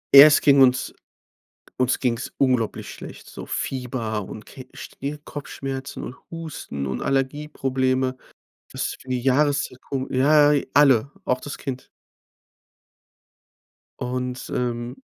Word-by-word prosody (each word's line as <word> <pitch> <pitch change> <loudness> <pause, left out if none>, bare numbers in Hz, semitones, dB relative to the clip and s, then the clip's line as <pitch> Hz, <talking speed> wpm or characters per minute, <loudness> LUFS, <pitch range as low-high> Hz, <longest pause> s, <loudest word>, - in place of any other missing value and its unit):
Erst 145 +2 +10
ging 140 -1 +6
uns 130 -1 +4 0.9
uns 130 0 +2
ging's 125 -1 -1
unglaublich 125 -5 +1
schlecht, - - -10
so - - -8
Fieber 120 -5 -3
und 110 - -9
Ke 130 -2 -11
Stir 145 +2 -6
Kopfschmerzen 135 -2 -6
und 125 - -7 0.2
Husten 155 - -5
und 65 - -3
Allergieprobleme. 130 -2 0 0.5
Das - - -2
ist - - -7
für 130 - -14
die 125 - 0
Jahreszeit 135 0 +1
kom 135 -1 -4
ja, 145 +3 +5 0.2
alle, 140 -3 +5
auch 125 0 0
das 145 - -6
Kind. 130 -3 -6 2.1
Und, 125 0 -3
ähm 120 -1 -2
130 Hz, 120 wpm, -23 LUFS, 125-140 Hz, 2.1 s, Erst